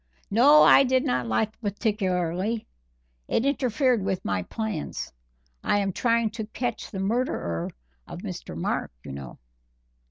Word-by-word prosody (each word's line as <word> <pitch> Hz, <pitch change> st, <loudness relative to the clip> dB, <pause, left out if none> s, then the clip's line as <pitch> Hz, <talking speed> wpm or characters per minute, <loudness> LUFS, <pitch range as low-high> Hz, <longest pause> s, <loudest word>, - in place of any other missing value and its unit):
"No, 280 Hz, +8 st, +7 dB
I -, -, +8 dB
did 260 Hz, 0 st, +2 dB
not 125 Hz, -1 st, 0 dB
like 160 Hz, -, +1 dB
it 215 Hz, -, -33 dB
particularly 200 Hz, -1 st, -1 dB, 0.6 s
it 235 Hz, -, +1 dB
interfered 255 Hz, -3 st, +2 dB
with 190 Hz, -1 st, -2 dB
my 95 Hz, -1 st, 0 dB
plans; 215 Hz, -, -4 dB, 0.5 s
I -, -, +2 dB
am 195 Hz, -2 st, 0 dB
trying 230 Hz, 0 st, +2 dB
to 220 Hz, -1 st, -5 dB
catch 240 Hz, +1 st, -3 dB
the 195 Hz, -, -7 dB
murderer 195 Hz, -, -1 dB, 0.4 s
of -, -, -8 dB
Mr. -, -, -6 dB
Mark, -, -, -2 dB
you -, -, -8 dB
know." 70 Hz, -2 st, -8 dB
215 Hz, 145 wpm, -26 LUFS, 180-240 Hz, 0.6 s, I